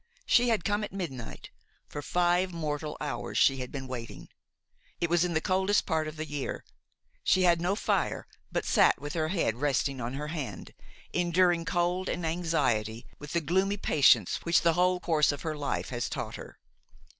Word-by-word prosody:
She 245 0 +4
had 220 -6 +1
come 205 +1 +1
at - - -5
midnight; 145 - -6 0.4
for 145 - -6
five 180 +3 +1
mortal 155 -2 -4
hours 150 - -4
she 135 - +4
had 125 -1 -6
been 135 -2 -5
waiting! 120 -3 -7 0.7
It 170 -1 -1
was 175 0 +4
in 175 -2 -1
the - - +4
coldest 190 +3 +2
part 160 -3 0
of 155 - -6
the 155 0 -4
year; 145 -3 -5 0.6
she 185 - +3
had 170 -2 +4
no 180 +3 +1
fire, - - -1 0.3
but - - -1
sat - - +4
with 145 +2 -6
her 155 -2 0
head 160 - 0
resting 140 -1 0
on 120 +2 -4
her 150 +2 -4
hand, 155 -5 -6 0.4
enduring 175 -1 +2
cold 175 +2 0
and 175 - -2
anxiety 135 -10 0
with 145 -1 -8
the 170 - +1
gloomy 190 +6 +1
patience 135 - +4
which 170 0 +2
the 170 -1 +3
whole 180 +1 +2
course 160 -4 +2
of 145 - -7
her 155 -1 -2
life 145 -1 -3
has 120 -1 -3
taught - - -4
her. - - -10
165 Hz, 185 wpm, -29 LUFS, 145-180 Hz, 0.7 s, She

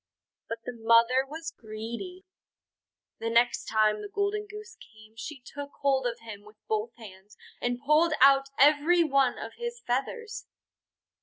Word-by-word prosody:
But 230 0 -5
the 250 - -5
mother 230 +3 +4
was 320 +3 -7
greedy. 235 - -7 0.9
The 230 - -2
next 235 +1 +2
time 215 -1 +2
the 205 - -7
Golden 405 - -1
Goose 425 +2 -10
came 215 0 -17
she 270 +4 -8
took 285 +1 -8
hold 270 -2 +2
of 235 -1 -5
him 215 -3 -9
with 210 +1 -17
both 220 +2 -2
hands, 205 -3 -14 0.2
and 245 0 -1
pulled 310 +3 +4
out 275 0 +6
every 305 +5 +5
one 275 -4 +2
of - - -7
his 475 0 -4
feathers. 425 - -3
260 Hz, 150 wpm, -28 LUFS, 225-315 Hz, 0.9 s, out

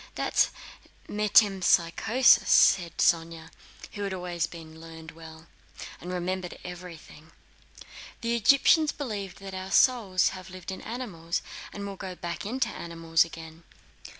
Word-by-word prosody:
"That - - -3
is - - +4 0.6
metempsychosis," 205 +2 +3
said 175 -4 +4
Sónya, 165 -1 0 0.4
who 205 - -7
had 195 -1 -3
always 175 -3 -3
learned 160 0 -11
well, 160 0 -13 0.5
and 180 - -7
remembered 180 0 -4
everything. 170 -3 -11 0.9
"The 235 0 0
Egyptians 275 +6 +4
believed 210 -9 -6
that 195 -1 -8
our 190 0 -6
souls 200 -5 +3
have 185 -1 -10
lived 185 0 -8
in 190 - -7
animals, 200 -9 -5 0.3
and 200 - -7
will 200 -1 -7
go 185 -1 -7
back 170 +2 -6
into 245 +1 -1
animals 165 -3 0
again." 165 0 -11
180 Hz, 125 wpm, -27 LUFS, 165-200 Hz, 0.9 s, is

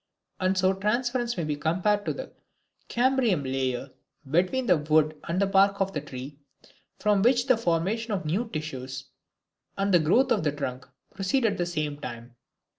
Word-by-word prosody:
And 185 +1 +1
so 185 +1 +3
transference 240 +4 -1
may 170 - -1
be 150 -1 -1
compared 185 +7 0
to - - +1
the - - -7 0.6
cambrium 245 - +2
layer 130 0 -2 0.4
between 185 - +1
the 180 -7 +4
wood 155 +1 +2
and 170 +2 -1
the 200 - +3
bark 195 0 +3
of 195 -1 -1
a 150 - -1
tree, 140 0 -8 0.6
from 210 -2 +2
which 245 +2 +3
the 255 -2 +5
formation 215 +3 -1
of 190 -5 -2
new 200 +10 -1
tissues 135 - -5 0.7
and 195 0 +1
the 175 - +7
growth 235 - +3
of 205 - +2
the 150 - +1
trunk 130 -3 -5 0.3
proceed 195 +7 0
at 210 - +1
the 175 - 0
same 155 -4 -3
time. 120 0 -8
185 Hz, 175 wpm, -27 LUFS, 150-210 Hz, 0.7 s, the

